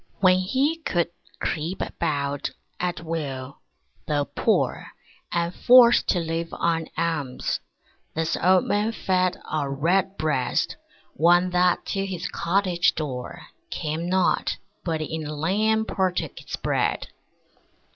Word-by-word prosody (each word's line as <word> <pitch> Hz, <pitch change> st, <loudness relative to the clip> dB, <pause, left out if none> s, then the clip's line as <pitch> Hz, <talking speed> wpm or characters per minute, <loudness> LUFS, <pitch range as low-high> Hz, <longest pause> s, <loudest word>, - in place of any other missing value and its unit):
When 185 Hz, -1 st, +5 dB
he 265 Hz, -, +1 dB
could 175 Hz, -, 0 dB, 0.3 s
creep 165 Hz, +4 st, -2 dB
about, 140 Hz, -1 st, -2 dB, 0.3 s
at 175 Hz, -1 st, -2 dB
will, 140 Hz, -5 st, -4 dB, 0.5 s
though 145 Hz, -2 st, +1 dB
poor -, -, 0 dB, 0.4 s
And 170 Hz, 0 st, 0 dB
forced 245 Hz, +1 st, +6 dB
to 180 Hz, -, +2 dB
live 165 Hz, 0 st, -2 dB
on 165 Hz, -1 st, 0 dB
alms, 160 Hz, -6 st, -1 dB, 0.6 s
this 165 Hz, +1 st, 0 dB
old 185 Hz, +1 st, +5 dB
Man 210 Hz, +2 st, 0 dB
fed 185 Hz, -3 st, +1 dB
A 150 Hz, -3 st, 0 dB
Redbreast, 155 Hz, -2 st, 0 dB, 0.4 s
one 175 Hz, +3 st, +4 dB
that 180 Hz, 0 st, +2 dB
to 195 Hz, -1 st, -1 dB
his 180 Hz, -2 st, -4 dB
cottage 180 Hz, -1 st, +1 dB
door 130 Hz, -5 st, -5 dB, 0.3 s
Came 160 Hz, +2 st, -3 dB
not, 185 Hz, -1 st, +2 dB, 0.3 s
but 160 Hz, -2 st, -1 dB
in 155 Hz, 0 st, -4 dB
a 150 Hz, -, -5 dB
lane 215 Hz, +8 st, +1 dB
partook 185 Hz, -4 st, -1 dB
his -, -, -5 dB
bread. -, -, 0 dB
170 Hz, 120 wpm, -25 LUFS, 155-185 Hz, 0.6 s, forced